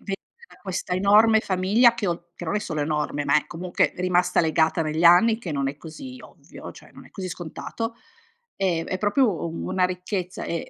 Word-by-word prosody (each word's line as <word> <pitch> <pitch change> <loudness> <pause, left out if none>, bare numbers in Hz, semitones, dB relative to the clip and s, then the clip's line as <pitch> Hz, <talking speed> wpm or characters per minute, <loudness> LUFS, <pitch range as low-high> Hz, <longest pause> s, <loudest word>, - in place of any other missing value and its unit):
ve 195 - -4 0.3
da - - -18
questa 190 -2 -3
enorme 210 +4 +5
famiglia 205 +6 +3
che 205 -4 -2
ho 170 0 -5
che 175 - -8
non 175 +5 -1
è - - +2
solo 160 -8 -4
enorme, 150 -1 -2
ma 140 +1 +3
è 150 - 0
comunque 175 +1 -1
rimasta 180 0 +2
legata 160 0 +1
negli 155 +2 -1
anni, 200 +7 +6
che 175 -9 -6
non 140 -1 -1
è 140 - -6
così 170 - -10
ovvio, - - -12
cioè - - -16
non - - -14
è - - -20
così 185 -2 -5
scontato, 205 +7 -6 0.6
ehm, 175 -4 0
è 185 - -3
proprio 205 -3 +1
u 165 0 -5
una 185 0 +1
ricchezza, 180 0 -3
e 170 - -4
180 Hz, 200 wpm, -24 LUFS, 165-200 Hz, 0.6 s, anni